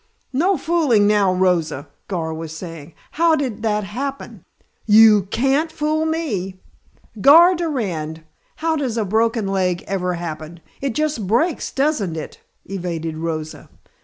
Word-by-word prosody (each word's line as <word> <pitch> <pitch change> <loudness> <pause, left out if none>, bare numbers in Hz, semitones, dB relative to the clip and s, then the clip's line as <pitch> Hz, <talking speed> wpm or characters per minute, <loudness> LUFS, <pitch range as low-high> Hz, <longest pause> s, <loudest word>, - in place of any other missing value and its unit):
"No 355 +8 +2
fooling 300 -11 +2
now, 205 -2 +3
Rosa," 180 -6 0 0.2
Gar 165 -4 -3
was 160 0 -7
saying, 165 -3 -9 0.2
"how 330 0 +3
did 255 -8 -3
that 210 -1 0
happen? 270 +8 -6 0.4
You 210 -2 +6
can't 275 +8 +1
fool 310 +1 -1
me 210 - -3 0.3
" 215 - -17
"Gar 335 - +8
Durand! 190 - -3 0.3
How 325 0 -1
does 260 -6 -2
a 220 - 0
broken 225 +1 +1
leg 185 -2 0
ever 180 -2 -2
happen? 165 -1 -7 0.2
It 270 -4 -2
just 300 -10 -1
breaks, 270 - 0
doesn't 265 - 0
it?" 155 - -7 0.3
evaded 170 -4 -4
Rosa. 160 -1 -5
210 Hz, 135 wpm, -20 LUFS, 175-285 Hz, 0.4 s, Gar